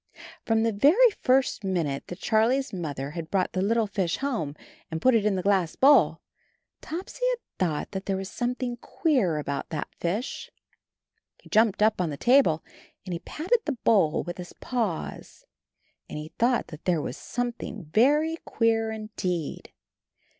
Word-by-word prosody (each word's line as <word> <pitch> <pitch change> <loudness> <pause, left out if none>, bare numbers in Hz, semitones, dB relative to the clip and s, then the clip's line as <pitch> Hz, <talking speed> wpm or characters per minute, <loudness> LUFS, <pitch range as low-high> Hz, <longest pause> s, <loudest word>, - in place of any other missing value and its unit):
From 225 -1 +3
the 230 - +2
very 350 - +5
first 260 -4 +2
minute 165 -8 -1
that 175 - -7
Charlie's 240 +5 +1
Mother 145 -6 -4
had 165 0 -6
brought 190 -2 0
the 185 - 0
little 225 +3 +2
fish 190 -4 -1
home 225 - -2 0.3
and 160 - -3
put 255 +9 +4
it 215 -2 +3
in 205 - +1
the 185 - -2
glass 190 -4 +2
bowl, 280 +2 +5 0.6
Topsy 370 +9 -6
had - - -6
thought 165 -5 -1
that 190 -1 -5
there 195 -1 0
was 190 0 -4
something 245 +2 -3
queer 250 - +1
about 140 -2 -3
that 155 -3 -5
fish. 200 +9 -3 0.9
He - - -18
jumped 215 -1 +3
up 215 -3 +3
on 175 - 0
the 145 - -5
table 235 - +4 0.4
and 185 - -4
he 170 - -3
patted 360 - 0
the 300 - 0
bowl 190 -9 +3
with 175 +1 -7
his 175 - -8
paws, 225 -10 -4 0.6
and - - -6
he 150 +1 -6
thought 235 +8 +1
that 155 -1 -11
there 175 -3 +2
was - - -4
something 240 -5 -4
very 300 +8 +3
queer 225 -1 +1
indeed. 215 -7 -4
210 Hz, 165 wpm, -26 LUFS, 175-245 Hz, 0.9 s, very